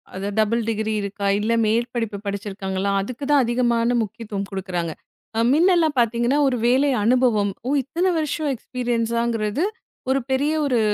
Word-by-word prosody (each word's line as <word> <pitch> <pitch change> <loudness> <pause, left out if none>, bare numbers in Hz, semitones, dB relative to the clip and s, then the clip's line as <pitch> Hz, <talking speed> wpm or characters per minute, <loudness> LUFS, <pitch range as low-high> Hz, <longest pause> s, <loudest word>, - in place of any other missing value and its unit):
அது 195 +1 -3
double 225 +2 +2
degree 220 0 -1
இருக்கா 200 0 -3
இல்ல 220 +2 0
மேற்படிப்பு 230 -1 -1
படிச்சிருக்காங்களா? 200 -1 -3
அதுக்கு 235 +7 -6
தான் 285 -2 +5
அதிகமான 240 0 +1
முக்கியத்துவம் 210 -2 -5
குடுக்குறாங்க. 180 -4 -3 0.5
அ - - +2
முன்ன 350 +5 +4
எல்லாம் 315 -3 +2
பார்த்தீங்கன்னா 235 +3 +2
ஒரு 255 -2 +1
வேலை 265 +4 +3
அனுபவம், 230 -4 +3 0.2
ஓ - - 0
இத்தன 335 +8 -2
வருஷம் 305 0 -1
எக்ஸ்பீரியன்ஸாங்கறது 235 - -1 0.5
ஒரு 270 - +2
பெரிய 285 +4 +1
ஒரு 255 -4 +2
235 Hz, 145 wpm, -22 LUFS, 205-255 Hz, 0.5 s, தான்